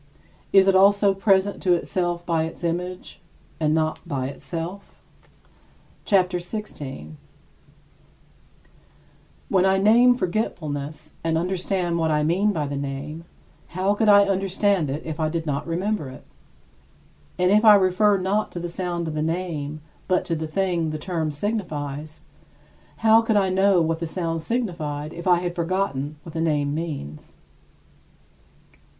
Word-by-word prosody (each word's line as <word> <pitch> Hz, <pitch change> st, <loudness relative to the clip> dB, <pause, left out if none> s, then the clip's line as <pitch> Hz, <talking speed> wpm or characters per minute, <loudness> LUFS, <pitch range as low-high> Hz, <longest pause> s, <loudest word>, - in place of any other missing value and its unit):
Is 195 Hz, 0 st, +6 dB
it 195 Hz, -, +4 dB
also 200 Hz, +1 st, +5 dB
present 195 Hz, 0 st, +2 dB
to 180 Hz, -, +3 dB
itself 175 Hz, 0 st, -1 dB
by 165 Hz, -2 st, +1 dB
its 165 Hz, -, -9 dB
image, 180 Hz, +2 st, -4 dB, 0.4 s
and 155 Hz, -1 st, +1 dB
not 155 Hz, 0 st, 0 dB
by 130 Hz, -2 st, -2 dB
itself? 170 Hz, +7 st, -7 dB, 1.1 s
CHAPTER 180 Hz, -3 st, +2 dB
XVI 210 Hz, +5 st, -6 dB, 0.3 s
24. -, -, -12 dB, 2.4 s
When 185 Hz, -1 st, +3 dB
I 190 Hz, 0 st, +3 dB
name 235 Hz, +5 st, +5 dB
forgetfulness, 155 Hz, -, -3 dB
and 165 Hz, -1 st, +1 dB
understand 180 Hz, 0 st, -1 dB
what 160 Hz, -1 st, +1 dB
I 150 Hz, -1 st, +1 dB
mean 185 Hz, +7 st, +2 dB
by 155 Hz, -6 st, -2 dB
the 140 Hz, 0 st, -4 dB
name, 140 Hz, +4 st, -5 dB, 0.5 s
how 190 Hz, +2 st, +2 dB
could 210 Hz, +1 st, +2 dB
I 200 Hz, 0 st, +7 dB
understand 195 Hz, -3 st, +1 dB
it 145 Hz, +3 st, -4 dB
if 160 Hz, 0 st, -5 dB
I 155 Hz, -1 st, +1 dB
did 165 Hz, 0 st, -3 dB
not 145 Hz, 0 st, -2 dB
remember 180 Hz, -2 st, -2 dB
it? 130 Hz, -, -12 dB, 1.1 s
And 180 Hz, +1 st, +2 dB
if 210 Hz, +2 st, +4 dB
I 215 Hz, -2 st, +9 dB
refer 200 Hz, +2 st, +3 dB
not 195 Hz, +3 st, -1 dB
to 175 Hz, -, -4 dB
the 175 Hz, 0 st, -4 dB
sound 175 Hz, -1 st, -3 dB
of 160 Hz, -, -4 dB
the 155 Hz, -, -2 dB
name, 155 Hz, -3 st, -3 dB, 0.3 s
but 185 Hz, -1 st, +1 dB
to 165 Hz, -, -1 dB
the 160 Hz, 0 st, -4 dB
thing 175 Hz, 0 st, 0 dB
which 155 Hz, -, -3 dB
the -, -, -2 dB
term 160 Hz, 0 st, -2 dB
signifies, 150 Hz, -4 st, -4 dB, 0.8 s
how 220 Hz, +1 st, +7 dB
could 225 Hz, -2 st, +1 dB
I 195 Hz, -2 st, +2 dB
know 190 Hz, -1 st, +3 dB
what 165 Hz, 0 st, -1 dB
that 170 Hz, -, -3 dB
sound 165 Hz, -1 st, -3 dB
signified 160 Hz, -8 st, -3 dB
if 170 Hz, +2 st, -7 dB
I 180 Hz, -, +6 dB
had 175 Hz, -1 st, -3 dB
forgotten 165 Hz, -5 st, -2 dB
what 165 Hz, -, -10 dB
the 165 Hz, -, -2 dB
name 145 Hz, -3 st, 0 dB
means? 145 Hz, -, -6 dB
175 Hz, 155 wpm, -23 LUFS, 155-195 Hz, 2.4 s, I